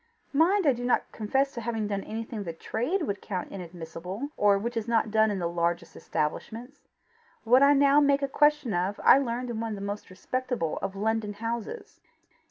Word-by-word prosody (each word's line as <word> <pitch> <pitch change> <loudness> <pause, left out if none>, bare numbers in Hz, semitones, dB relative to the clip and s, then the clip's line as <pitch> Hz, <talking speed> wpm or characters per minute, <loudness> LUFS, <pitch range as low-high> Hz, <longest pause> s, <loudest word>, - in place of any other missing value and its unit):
Mind 350 +6 +3
I 280 - +5
do 245 0 -6
not 245 - +1
confess 270 +6 0
to 235 - -5
having 225 -2 -2
done 200 -1 -2
anything 225 -1 -5
the 170 -3 -5
trade 250 - -2
would 200 -9 -3
count 185 -4 -4
inadmissible, 180 - -6
or 205 -1 +4
which 235 +4 -3
is 225 -1 -2
not 225 -2 +1
done 220 0 +4
in 205 - -1
the 175 -2 -1
largest 170 0 -2
establishments. 230 - -4 0.6
What 250 +3 +5
I 280 +1 +7
now 280 +1 +5
make 280 -1 +3
a - - +2
question 295 -3 +2
of 185 +3 -1
I - - +8
learned 245 -1 -2
in 225 - -4
one 225 -1 -3
of - - -3
the 200 - -8
most 205 +1 -5
respectable 245 - -3
of 195 - -3
London 215 +1 -1
houses." 235 - -5
225 Hz, 195 wpm, -27 LUFS, 200-265 Hz, 0.6 s, I